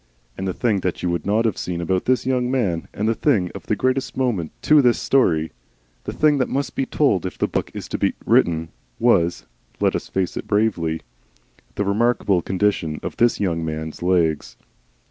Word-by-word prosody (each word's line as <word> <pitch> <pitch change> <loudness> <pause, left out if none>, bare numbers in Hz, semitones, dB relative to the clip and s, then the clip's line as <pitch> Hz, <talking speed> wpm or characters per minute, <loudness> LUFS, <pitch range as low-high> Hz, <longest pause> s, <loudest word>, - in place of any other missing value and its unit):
And 95 - -4
the 95 - -1
thing 110 -5 +1
that 90 -1 -3
you 90 - +1
would 85 +1 -3
not 110 +3 +2
have 110 -5 0
seen 90 -1 -3
about 90 +2 -1
this 130 -2 +1
young 125 -1 0
man, 105 -11 -1
and 105 - -2
the 115 - +3
thing 110 - +1
of - - -10
the 110 - +1
greatest 130 +5 -1
moment 115 -12 -1
to 150 -1 +6
this 125 -3 +3
story, 80 -12 +2 0.5
the - - -3
thing 150 -2 +2
that 130 - 0
must 140 +1 -2
be 135 - -1
told 135 - +2
if 90 -3 -5
the - - +1
book - - -2
is - - -6
to - - -3
be - - +1
written, 80 -1 +2 0.3
was 85 +1 +2 0.3
let - - +2
us - - -3
face 95 -2 -1
it - - -5
bravely 95 -7 0 0.7
the 100 - -1
Remarkable 100 -2 +2
Condition 95 -5 0
of - - -5
this 120 0 +3
Young 85 -5 -1
Man's 80 0 -5
Legs. 85 -4 +1
100 Hz, 200 wpm, -22 LUFS, 85-120 Hz, 0.7 s, to